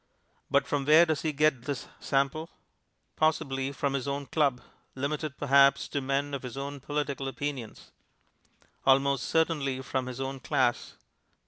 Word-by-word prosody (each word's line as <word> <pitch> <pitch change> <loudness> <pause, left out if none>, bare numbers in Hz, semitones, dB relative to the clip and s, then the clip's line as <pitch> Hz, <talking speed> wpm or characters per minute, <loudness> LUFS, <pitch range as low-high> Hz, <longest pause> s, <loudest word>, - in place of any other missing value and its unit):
But 140 0 +3
from 140 -1 -1
where 155 +4 +7
does 155 -3 -1
he 160 - 0
get 150 -4 +2
his 140 -2 -4
sample? 140 +4 0 0.7
Possibly 140 -4 0
from 140 0 -2
his 135 -1 -2
own 140 0 -2
club, 140 -4 +1 0.4
limited 145 +2 -3
perhaps 140 -1 +4
to 140 - -2
men 140 +2 -1
of 140 - -3
his 125 0 -7
own 140 +1 -5
political 140 -1 -3
opinions; 135 -4 -5 0.9
almost 135 0 +3
certainly 150 -5 +1
from 130 -1 -2
his 130 0 -6
own 135 0 -4
class. 120 - 0
140 Hz, 145 wpm, -29 LUFS, 135-145 Hz, 0.9 s, where